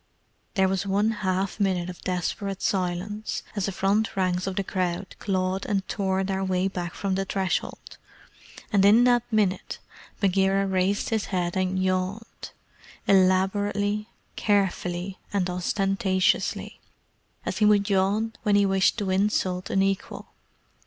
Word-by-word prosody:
There 190 -2 +4
was 195 +1 -1
one 205 +3 +2
half 195 -1 -2
minute 185 -3 +1
of 180 -1 -8
desperate 185 +2 -3
silence, 190 +3 -2
as 200 -2 -1
the - - -1
front 200 +4 0
ranks 185 0 0
of 190 - -3
the 200 - 0
crowd 185 -1 -3
clawed 190 -1 -1
and 195 -2 -1
tore 190 -1 0
their 190 0 -2
way 185 0 +1
back 175 -2 -5
from 195 -1 -2
the 195 +1 0
threshold, 190 -2 -3 0.7
and 200 -2 +4
in 215 +4 +7
that 245 -1 +2
minute 200 -4 0 0.4
Bagheera 195 0 +2
raised 190 +1 0
his 220 -2 0
head 175 -2 -2
and 185 0 0
yawned 185 +4 -2 0.6
elaborately, 205 +3 +2 0.3
carefully, 190 -2 0
and 195 -3 0
ostentatiously 190 +1 0 0.7
as - - -3
he 210 - +4
would 205 -1 +4
yawn 205 +3 +1
when 210 -2 +2
he 205 0 +4
wished 195 +2 +2
to 200 -4 -1
insult 185 -2 0
an 195 - +2
equal. 195 0 -3
195 Hz, 140 wpm, -26 LUFS, 185-205 Hz, 0.7 s, in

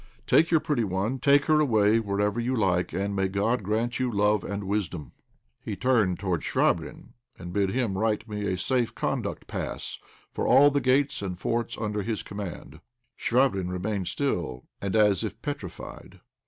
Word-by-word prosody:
Take 165 - +4
your 165 - +4
pretty 145 -6 0
one, 100 +6 -1
take 140 +1 +4
her 155 -1 +4
away 110 -6 +4
wherever 105 +1 -1
you 125 +2 0
like, 90 -5 +1
and 100 +1 -2
may 95 -1 +1
God 100 +6 0
grant 110 +5 -1
you 130 -1 0
love 105 0 +2
and 100 +1 -4
wisdom." 95 - -3 0.5
He 105 - -4
turned 105 -5 +2
towards 90 -4 -2
Chvabrine, - - 0 0.3
and 90 -1 -8
bid 100 -1 +1
him 115 -3 -1
write 110 +2 0
me 105 -1 -3
a 95 - -1
safe 125 +4 0
conduct - - -2
pass - - -5 0.3
for - - -2
all 140 +3 +7
the 140 0 +1
gates 130 +1 +2
and 95 -3 -4
forts 115 +5 -2
under 105 -2 -2
his 110 +1 -3
command. 100 -4 -7 0.4
Chvabrine 115 -8 +1
remained 95 +1 -2
still, 85 - -2 0.2
and 100 0 -2
as 105 -5 +4
if - - -5
petrified. - - -7
105 Hz, 170 wpm, -27 LUFS, 95-120 Hz, 0.5 s, all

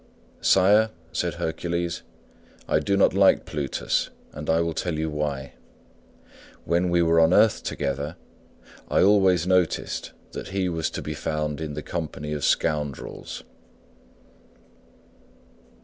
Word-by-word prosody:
"Sire," 105 +4 +5 0.2
said 85 +1 -1
Hercules, 85 +1 -2 0.7
"I - - +3
do 100 0 0
not 100 - +4
like 100 0 +4
Plutus, 70 -3 -1 0.2
and 75 +1 -7
I 80 +1 +4
will 85 -1 0
tell 80 0 -2
you 80 0 -2
why. 70 -3 -3 1.1
When 85 +1 +1
we 85 0 +3
were 80 0 +4
on 80 +2 +5
earth 110 +1 +4
together 70 +3 -3 0.7
I - - +3
always 95 -4 +4
noticed 90 -2 0 0.2
that - - -6
he 95 -1 -1
was 80 -2 -1
to - - -6
be 75 - -4
found 75 0 -3
in 75 -2 -4
the 75 - -5
company 75 -3 -4
of 75 -2 -4
scoundrels." 75 -4 -1
80 Hz, 130 wpm, -25 LUFS, 75-90 Hz, 1.1 s, Sire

